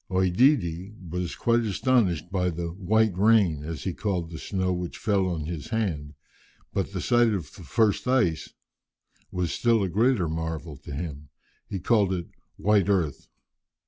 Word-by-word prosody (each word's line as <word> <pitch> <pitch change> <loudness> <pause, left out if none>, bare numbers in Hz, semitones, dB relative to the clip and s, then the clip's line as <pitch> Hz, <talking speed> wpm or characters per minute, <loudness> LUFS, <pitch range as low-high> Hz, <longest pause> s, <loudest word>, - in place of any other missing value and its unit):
OEdidi 95 - +2 0.2
was 90 -1 -3
quite 115 0 +2
astonished 100 - +1
by 90 -2 +1
the 85 0 -3
"white 105 +2 +1
rain," 95 -7 +3
as 80 0 -5
he 95 - -2
called 90 -5 -2
the 80 - -7
snow 95 -2 -1
which 90 -1 -4
fell 100 -3 +1
on 85 -4 -2
his 80 -2 -5
hand, 85 -11 -2 0.6
but - - -1
the - - -3
sight 120 -1 +4
of 80 -6 -6
the - - -12
first 105 - +1
ice 120 -12 +1 0.8
was 90 -2 -2
a - - -3
still 115 -4 +2
greater 110 0 +2
marvel 80 -1 -4
to 70 - -11
him; 75 -1 -6 0.4
he 100 - -3
called 100 0 +2
it 85 -1 -4 0.3
"white 100 -2 +3
earth." 85 -8 0
90 Hz, 160 wpm, -26 LUFS, 85-105 Hz, 0.8 s, sight